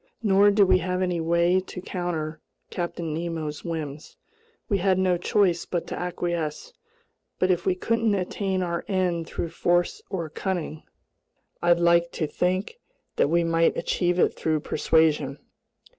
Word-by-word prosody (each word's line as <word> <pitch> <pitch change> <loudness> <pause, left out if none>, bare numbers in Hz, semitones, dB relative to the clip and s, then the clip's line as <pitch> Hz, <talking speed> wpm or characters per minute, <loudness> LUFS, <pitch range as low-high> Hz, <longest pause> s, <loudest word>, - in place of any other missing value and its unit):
Nor 200 -1 +5
did 205 0 +5
we 185 -1 +4
have 180 +1 -1
any 175 -2 -1
way 170 +2 +3
to 185 0 -8
counter 170 -4 -4 0.3
Captain 170 -2 -3
Nemo's 160 -2 -4
whims. 155 -3 -6 0.5
We 200 -3 +1
had 190 0 +2
no 185 -1 +2
choice 175 -1 +1
but 175 -2 -2
to - - -5
acquiesce; 175 - -3 0.6
but 185 - +2
if 180 0 -1
we 185 - +3
couldn't 225 +2 +1
attain 190 0 -1
our 170 -1 -2
end 180 -4 0
through 170 - -4
force 175 +1 +1
or 175 -5 -3
cunning, 160 -2 -4 0.8
I 175 - +3
liked 170 0 +3
to 155 - -1
think 185 - -1 0.4
we 170 +4 +2
might 165 0 +2
achieve 175 -1 0
it - - +3
through 155 -2 -1
persuasion. 150 -4 +1
175 Hz, 145 wpm, -25 LUFS, 165-185 Hz, 0.8 s, Nor